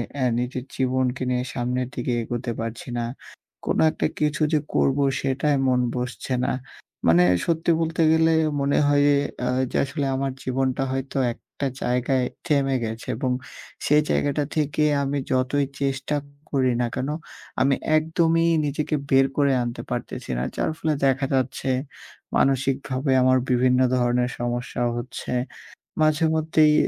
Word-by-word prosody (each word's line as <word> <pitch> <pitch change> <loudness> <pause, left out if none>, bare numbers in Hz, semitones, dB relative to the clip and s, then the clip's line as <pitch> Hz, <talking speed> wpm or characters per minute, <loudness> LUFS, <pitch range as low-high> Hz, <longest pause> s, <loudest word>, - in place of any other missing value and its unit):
অ্যা 135 -3 0
নিজের 125 +1 -3
জীবনকে 130 0 0
নিয়ে 125 0 0
সামনের 125 0 -1
দিকে 120 0 -2
এগোতে 120 +1 -3
পারছি 115 0 -5
না। 120 - -1 0.6
কোন - - 0
একটা - - -1
কিছু 150 +1 0
যে 155 - +4 0.2
করব 135 0 +3 0.2
সেটায় 140 +2 +1
মন 125 -1 +3 0.2
বসছে 125 +1 -3
না। - - +1 0.6
মানে 85 +2 +6 0.2
সত্যি 165 0 +1
বলতে 165 0 0
গেলে 160 0 +4 0.3
মনে 140 +1 +2
হয় 145 0 +4
এ - - +3 0.2
অ্যা 125 - 0 0.2
যে - - -1
আসলে 140 +1 -3
আমার 135 0 -1
জীবনটা 130 +1 0
হয়তো 135 +1 -3 0.2
একটা 140 - -7 0.2
জায়গায় 125 +1 +1 0.2
থেমে 135 -2 +2
গেছে। 110 +1 -6
এবং 130 -1 -1 0.5
সেই 150 +1 +5
জায়গাটা 145 +1 +1
থেকে 150 -1 +1 0.2
আমি 140 +1 -1
যতই 130 +2 +1 0.2
চেষ্টা 135 +1 -1 0.4
করি 130 -3 +2
না 120 - +1
কেন, 135 - -2 0.5
আমি 135 +1 +4 0.2
একদমই 165 +1 +2 0.2
নিজেকে 150 +1 -1
বের 135 0 +5
করে 140 -2 +3
আনতে 120 0 -4
পারতেছি 125 - -4
না। 60 - -1
যার - - 0
ফলে 155 -1 0
দেখা 135 0 +2
যাচ্ছে, 130 0 -1 0.7
মানসিকভাবে 135 0 +1
আমার 130 0 +5
বিভিন্ন 125 0 +3 0.2
ধরনের 125 0 +1
সমস্যা 120 +1 -3
হচ্ছে। 120 +2 -6 0.7
মাঝেমধ্যেই 155 0 +3
135 Hz, 145 wpm, -24 LUFS, 125-145 Hz, 0.7 s, মানে